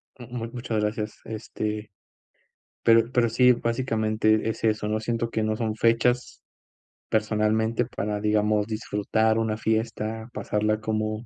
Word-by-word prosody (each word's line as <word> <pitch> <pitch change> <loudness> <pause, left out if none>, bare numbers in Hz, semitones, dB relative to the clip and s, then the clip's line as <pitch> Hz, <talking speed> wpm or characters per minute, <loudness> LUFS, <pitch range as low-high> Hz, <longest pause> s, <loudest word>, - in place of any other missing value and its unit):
M 120 -2 -11 0.2
m 115 - -4
muchas 120 -3 -2
gracias, 105 0 -3
este, 110 -1 -4 0.9
pero 115 +1 +5
pero 120 -2 +3
sí, 125 +2 +5
básicamente 110 -3 +1
es 110 - -5
eso, 110 -1 +1
¿no?, 110 +1 0
siento 115 +1 -2
que 110 - -1
no 110 0 0
son 110 -1 -2
fechas 115 +2 +1 0.7
personalmente 110 +2 +1
para, 105 -3 -3
digamos, 105 0 +2
disfrutar 110 0 0
una 110 -1 0
fiesta, 110 0 -2
pasarla 105 +1 0
como 110 +1 -2
110 Hz, 135 wpm, -26 LUFS, 110-115 Hz, 0.9 s, pero